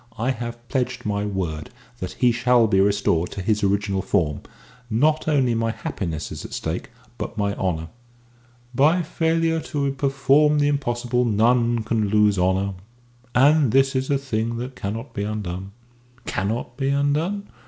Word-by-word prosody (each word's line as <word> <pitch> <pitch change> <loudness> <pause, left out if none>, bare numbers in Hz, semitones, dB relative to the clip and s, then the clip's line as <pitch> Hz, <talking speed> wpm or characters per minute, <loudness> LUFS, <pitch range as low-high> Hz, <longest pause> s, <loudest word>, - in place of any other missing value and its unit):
I 120 +4 0
have 120 -1 -6
pledged 125 -2 -2
my 105 -1 -1
word 85 -6 -3 0.3
that 95 -1 -5
he 125 +3 +3
shall 125 0 +3
be 95 -3 +3
restored 100 -4 +2
to 100 - -5
his 105 +1 +1
original 100 0 +1
form. 75 -5 0 0.5
Not 150 +9 +2
only 135 -6 +2
my 115 0 0
happiness 85 -7 -4
is - - -6
at - - -9
stake, 80 +3 -4 0.3
but 105 - -5
my 100 -1 0
honour." 80 -5 -2 0.9
"By 155 +8 +3
failure 165 0 +1
to 140 -2 -2
perform 140 +2 +3
the 145 0 +3
impossible 125 -3 0
none 115 +1 +2
can 110 -1 0
lose 105 -2 +3
honour. 95 +2 +1 0.6
And 145 0 +5
this 135 +2 +3
is 130 0 -1
a 140 - +3
thing 115 -4 -2
that 125 +2 -5
cannot 110 +6 -5
be 100 - -3
undone." 100 -2 -4 0.5
"Cannot 115 +5 -3
be 135 0 0
undone?" 150 +9 0
115 Hz, 155 wpm, -23 LUFS, 100-135 Hz, 0.9 s, And